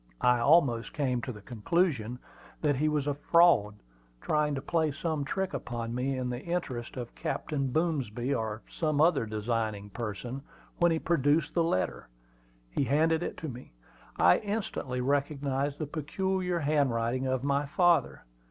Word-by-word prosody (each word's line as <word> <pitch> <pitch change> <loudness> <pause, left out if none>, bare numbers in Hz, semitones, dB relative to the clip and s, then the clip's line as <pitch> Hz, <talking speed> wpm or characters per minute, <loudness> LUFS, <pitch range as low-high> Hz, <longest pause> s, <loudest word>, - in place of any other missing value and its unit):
I 125 -1 +5
almost 125 -3 +3
came 130 -4 0
to 130 - -4
the 105 -4 -11
conclusion 125 - 0 0.5
that 145 -2 +3
he 155 +3 +2
was 150 -2 0
a 145 - 0
"fraud," 145 -8 +4 0.4
trying 150 - +1
to - - -2
play 160 -1 +1
some 155 0 -2
trick 190 +7 -2
upon 115 -1 -4
me, 130 +2 -1
in 130 -1 -2
the 120 +1 -4
interest 140 -9 -4
of 120 -2 -6
Captain 140 -4 -2
Boomsby, 135 -6 0
or 110 -3 -3
some 155 -3 -1
other 155 -7 +4
designing 110 -1 -2
person, 120 +4 -5 0.4
when 175 -1 +4
he 165 - +2
produced 155 -1 +1
the 170 - +2
letter. 95 - -1 0.6
He - - 0
handed 160 +4 +2
it - - -4
to 160 - -5
me. 125 - -9 0.4
I 90 - +5
instantly 200 - -3
recognized 140 0 0
the 155 - -3
peculiar 180 +4 -1
handwriting 130 -4 +1
of 130 -1 -1
my 140 +1 +1
father. 175 +3 +2
140 Hz, 155 wpm, -29 LUFS, 120-160 Hz, 0.6 s, I